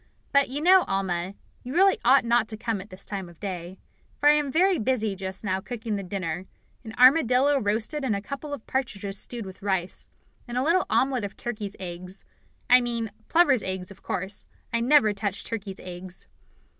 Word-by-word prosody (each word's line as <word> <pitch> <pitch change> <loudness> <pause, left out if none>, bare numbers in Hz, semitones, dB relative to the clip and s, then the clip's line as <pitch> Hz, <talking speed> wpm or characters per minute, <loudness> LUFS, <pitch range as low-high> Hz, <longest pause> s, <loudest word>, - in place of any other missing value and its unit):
But, 280 -2 +4
you 280 +3 -3
know, 370 +3 +7
Alma, 190 -1 -1 0.3
you 255 +4 -7
really 385 +2 +5
ought 255 +1 +5
not 235 -1 +3
to 215 - -6
come 225 -3 -2
at 200 - -12
this 185 +1 -11
time 195 -4 -5
of 170 - -17
day, 185 -2 -5 0.4
for 295 - +6
I - - +8
am 295 -2 +1
very 365 +4 +3
busy 220 -3 0
just 190 +1 -6
now 190 -2 0
cooking 225 -1 -4
the 200 - -2
dinner 185 -2 -4 0.4
an 220 -1 -9
armadillo 260 +1 +5
roasted 225 +7 -1
and 235 -6 +1
a - - -1
couple 280 +7 -6
of 280 -6 -6
partridges 200 -7 -3
stewed 235 -3 -5
with 190 +1 -10
rice, 190 -3 -2 0.4
and 240 0 -4
a 255 - +2
little 340 +5 +2
omelette 260 -4 +2
of 200 - -6
turkeys' 210 -4 -5
eggs 180 +1 -6 0.4
I 250 +1 +7
mean 235 -3 -3 0.2
plovers' 290 -8 +4
eggs, 185 0 -4
of 195 - -14
course; 190 +2 -4 0.3
I 235 - +2
never 235 -3 +5
touch 200 0 -3
turkeys' 200 -4 -5
eggs." 180 0 -7
220 Hz, 195 wpm, -26 LUFS, 190-260 Hz, 0.4 s, I